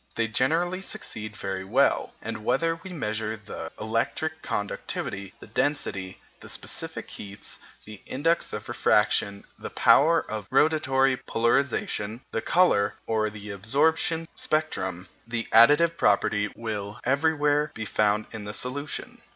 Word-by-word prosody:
They 115 Hz, 0 st, +1 dB
generally 165 Hz, -, +1 dB
succeed 110 Hz, -, -5 dB
very 95 Hz, 0 st, -4 dB
well; 125 Hz, +9 st, +2 dB
and -, -, -5 dB
whether 165 Hz, +8 st, +1 dB
we 190 Hz, -, -9 dB
measure 110 Hz, -8 st, -3 dB
the 105 Hz, 0 st, -8 dB
electric 155 Hz, +8 st, -1 dB
conductivity, 100 Hz, -1 st, -4 dB
the -, -, -11 dB
density, 105 Hz, -6 st, -2 dB, 0.2 s
the -, -, -11 dB
specific -, -, -4 dB
heats, 100 Hz, 0 st, -8 dB, 0.3 s
the 105 Hz, -2 st, -11 dB
index 165 Hz, +6 st, +1 dB
of 105 Hz, +1 st, -6 dB
refraction, 105 Hz, -3 st, +2 dB
the -, -, -6 dB
power 165 Hz, +4 st, +5 dB
of 110 Hz, -2 st, -5 dB
rotatory 135 Hz, -2 st, +3 dB
polarization, 115 Hz, -2 st, 0 dB
the 115 Hz, -, -1 dB
colour, 110 Hz, -, +3 dB
or 110 Hz, -1 st, +1 dB
the 105 Hz, 0 st, -8 dB
absorption 160 Hz, -, +1 dB
spectrum, 95 Hz, -, -1 dB, 0.2 s
the 115 Hz, -1 st, -3 dB
additive 150 Hz, +9 st, +6 dB
property 105 Hz, 0 st, +2 dB
will 105 Hz, -1 st, -5 dB
everywhere 145 Hz, +2 st, +2 dB
be 110 Hz, -, -4 dB
found 105 Hz, 0 st, +1 dB
in 110 Hz, -3 st, -7 dB
the 105 Hz, -, -5 dB
solution. 140 Hz, +3 st, -4 dB
115 Hz, 130 wpm, -26 LUFS, 105-150 Hz, 0.3 s, additive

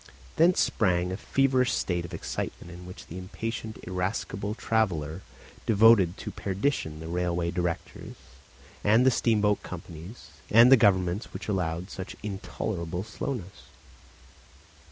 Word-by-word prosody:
Thence 175 Hz, +3 st, +4 dB
sprang 90 Hz, -3 st, +2 dB
a -, -, -2 dB
feverish 130 Hz, +4 st, +2 dB
state 85 Hz, -2 st, -1 dB
of 85 Hz, -, -10 dB
excitement 85 Hz, -, -5 dB
in 90 Hz, +1 st, -10 dB
which 90 Hz, -, -10 dB
the 90 Hz, -, -8 dB
impatient 110 Hz, +3 st, -5 dB
irascible 95 Hz, +2 st, -3 dB
traveller 90 Hz, -9 st, 0 dB, 0.5 s
devoted 105 Hz, -4 st, +5 dB
to -, -, -6 dB
perdition 95 Hz, -, -2 dB
the 80 Hz, -, -7 dB
railway 85 Hz, 0 st, -1 dB
directors 85 Hz, -1 st, -4 dB, 0.7 s
and 110 Hz, +5 st, +5 dB
the 130 Hz, -, +6 dB
steamboat 105 Hz, -4 st, +2 dB
companies 85 Hz, +4 st, -9 dB, 0.2 s
and 115 Hz, +4 st, +7 dB
the -, -, +11 dB
governments 95 Hz, -3 st, +2 dB
which -, -, -6 dB
allowed 90 Hz, -2 st, -2 dB
such 95 Hz, -1 st, -7 dB
intolerable 95 Hz, -3 st, -4 dB
slowness. 105 Hz, -2 st, -6 dB
95 Hz, 125 wpm, -28 LUFS, 90-110 Hz, 0.7 s, the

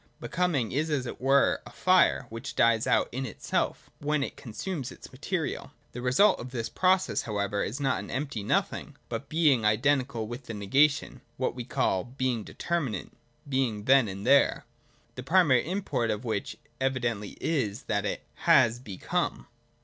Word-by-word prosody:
(Becoming 160 Hz, -11 st, 0 dB
is 155 Hz, +4 st, 0 dB
as 140 Hz, -4 st, 0 dB
it 125 Hz, -, -7 dB
were 135 Hz, +1 st, +3 dB
a -, -, -11 dB
fire, 185 Hz, -7 st, +3 dB
which 115 Hz, +4 st, -7 dB
dies 115 Hz, -1 st, +3 dB
out -, -, +3 dB
in 130 Hz, +2 st, -3 dB
itself, 115 Hz, -7 st, -3 dB
when 150 Hz, 0 st, 0 dB
it -, -, -5 dB
consumes 135 Hz, -, -5 dB
its -, -, -12 dB
material. -, -, -3 dB, 0.2 s
The 125 Hz, -, -7 dB
result 130 Hz, +12 st, +4 dB
of 125 Hz, -, -7 dB
this 120 Hz, -3 st, -4 dB
process 185 Hz, 0 st, +2 dB
however 100 Hz, -2 st, -2 dB
is 120 Hz, +9 st, -4 dB
not 135 Hz, -7 st, +1 dB
an 100 Hz, -, -8 dB
empty 135 Hz, -4 st, -3 dB
Nothing, 100 Hz, -, -1 dB
but 140 Hz, -, -5 dB
Being 150 Hz, -7 st, +3 dB
identical 120 Hz, +2 st, +1 dB
with 120 Hz, +3 st, -8 dB
the 115 Hz, -, -5 dB
negation, 135 Hz, +6 st, +2 dB
— -, -, -39 dB
what 130 Hz, -, -1 dB
we 125 Hz, -2 st, -6 dB
call 95 Hz, -6 st, 0 dB
Being 125 Hz, -3 st, -2 dB
Determinate 165 Hz, -6 st, -3 dB, 0.4 s
(being 130 Hz, -6 st, 0 dB
then 130 Hz, 0 st, +5 dB
and 100 Hz, +1 st, -6 dB
there): 140 Hz, 0 st, +4 dB, 0.5 s
the 125 Hz, -, -7 dB
primary 145 Hz, -3 st, +3 dB
import 150 Hz, -, -1 dB
of 105 Hz, +3 st, -2 dB
which 110 Hz, -3 st, -3 dB, 0.2 s
evidently 120 Hz, -6 st, -2 dB
is 125 Hz, -11 st, -1 dB
that -, -, -1 dB
it -, -, -3 dB, 0.2 s
has 115 Hz, +1 st, +5 dB
become. 100 Hz, -8 st, -3 dB
130 Hz, 165 wpm, -28 LUFS, 110-140 Hz, 0.5 s, then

